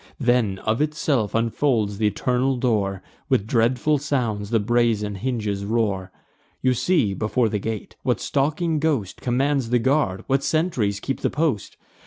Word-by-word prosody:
Then, 120 Hz, -7 st, +2 dB
of 110 Hz, +5 st, +1 dB
itself, 145 Hz, -8 st, 0 dB
unfolds 115 Hz, -3 st, +1 dB
th' -, -, -7 dB
eternal 125 Hz, +5 st, +1 dB
door; 105 Hz, -6 st, 0 dB, 0.3 s
With 100 Hz, -, +2 dB
dreadful 125 Hz, +6 st, +2 dB
sounds 120 Hz, -8 st, -1 dB
the 115 Hz, -1 st, +2 dB
brazen 110 Hz, -2 st, +1 dB
hinges 105 Hz, -2 st, -2 dB
roar. 100 Hz, -4 st, -1 dB, 0.5 s
You 130 Hz, 0 st, +2 dB
see, 125 Hz, -, +1 dB
before 110 Hz, +3 st, 0 dB
the 105 Hz, -, -1 dB
gate, 110 Hz, +1 st, -5 dB
what -, -, 0 dB
stalking 155 Hz, +3 st, 0 dB
ghost 140 Hz, -, -1 dB
Commands 135 Hz, 0 st, 0 dB
the 125 Hz, -, +3 dB
guard, 130 Hz, -6 st, +1 dB
what 135 Hz, +1 st, +1 dB
sentries 130 Hz, -, 0 dB
keep 135 Hz, +5 st, -3 dB
the -, -, 0 dB
post. 145 Hz, -9 st, -1 dB
120 Hz, 150 wpm, -23 LUFS, 105-135 Hz, 0.5 s, the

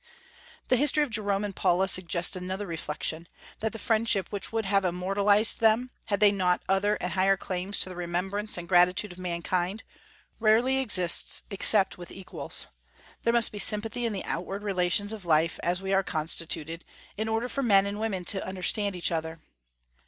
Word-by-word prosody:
The 255 Hz, -, +4 dB
history 295 Hz, +3 st, +3 dB
of 285 Hz, -, -4 dB
Jerome 205 Hz, -2 st, -1 dB
and 200 Hz, -2 st, -6 dB
Paula 185 Hz, +2 st, +2 dB
suggests 175 Hz, -2 st, +1 dB
another 185 Hz, +2 st, -4 dB
reflection, 165 Hz, -1 st, -4 dB, 0.3 s
that 220 Hz, 0 st, -2 dB
the 225 Hz, -, -7 dB
friendship 220 Hz, -3 st, +1 dB
which 205 Hz, -2 st, -2 dB
would 225 Hz, -1 st, -1 dB
have 195 Hz, 0 st, +2 dB
immortalized 200 Hz, +4 st, +2 dB
them, 230 Hz, +3 st, +3 dB
had 200 Hz, -2 st, -1 dB
they 205 Hz, 0 st, +6 dB
not 180 Hz, -3 st, +1 dB
other 195 Hz, +2 st, +2 dB
and 180 Hz, -, -4 dB
higher 190 Hz, +1 st, +3 dB
claims 185 Hz, +2 st, -1 dB
to -, -, -1 dB
the 185 Hz, -, -8 dB
remembrance 180 Hz, +5 st, -2 dB
and 175 Hz, -1 st, -6 dB
gratitude 180 Hz, +3 st, +3 dB
of 175 Hz, -, -12 dB
mankind, 180 Hz, +3 st, -2 dB, 0.6 s
rarely 230 Hz, +4 st, +3 dB
exists 185 Hz, -10 st, +1 dB
except 195 Hz, -1 st, +3 dB
with 175 Hz, -, -8 dB
equals. 190 Hz, -, -3 dB, 0.6 s
There 230 Hz, -, +2 dB
must 235 Hz, -1 st, +5 dB
be 205 Hz, -, -7 dB
sympathy 225 Hz, +4 st, 0 dB
in -, -, -2 dB
the 195 Hz, -, -4 dB
outward 195 Hz, +4 st, -4 dB
relations 200 Hz, +1 st, 0 dB
of 215 Hz, -3 st, -8 dB
life, 165 Hz, -1 st, +1 dB
as 180 Hz, +2 st, -1 dB
we 195 Hz, 0 st, -1 dB
are 195 Hz, -, +4 dB
constituted, 165 Hz, -1 st, -3 dB, 0.3 s
in 220 Hz, +2 st, -3 dB
order 225 Hz, +2 st, -1 dB
for 275 Hz, -, -3 dB
men 200 Hz, -6 st, +4 dB
and 200 Hz, +1 st, -4 dB
women 200 Hz, -5 st, -2 dB
to 190 Hz, -, 0 dB
understand 190 Hz, +2 st, -2 dB
each 175 Hz, -, -1 dB
other. 160 Hz, 0 st, -3 dB
195 Hz, 180 wpm, -27 LUFS, 180-215 Hz, 0.6 s, they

